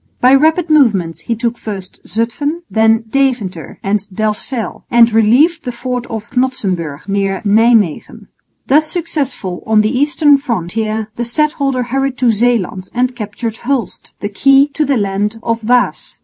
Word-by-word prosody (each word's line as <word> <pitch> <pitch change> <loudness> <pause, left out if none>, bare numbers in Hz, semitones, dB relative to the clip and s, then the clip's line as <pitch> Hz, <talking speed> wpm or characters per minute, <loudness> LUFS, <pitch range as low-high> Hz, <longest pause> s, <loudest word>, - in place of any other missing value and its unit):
By 255 +2 +5
rapid 315 +4 +3
movements 205 - +2
he 230 - -3
took 235 +1 -2
first 195 -4 -7
Zutphen, 245 - -2
then 225 +1 +3
Deventer 240 - -1
and 200 +2 +1
Delfzijl, 215 +3 -3
and 235 -1 +5
relieved 260 +10 +3
the 250 - -3
fort 245 0 -4
of 220 -1 -7
Knodsenburg 190 - -2
(near 195 -1 -1
Nijmwegen). 215 -4 +2 0.4
Thus 305 +3 +3
successful 280 - -3
on 220 -1 +4
the 215 +5 0
eastern 290 +1 +3
frontier, 220 -2 -3
the 240 - -1
stadholder 275 0 0
hurried 270 +1 -2
to 245 -2 +3
Zeeland 210 -5 0
and 250 +1 0
captured 225 0 -5
Hulst, 250 -5 -3
the 205 - -2
key 275 +6 +4
to 300 +2 -1
the 275 -2 +1
land 205 +2 -1
of 230 0 -1
Waas. 245 +2 0
235 Hz, 150 wpm, -15 LUFS, 210-270 Hz, 0.4 s, By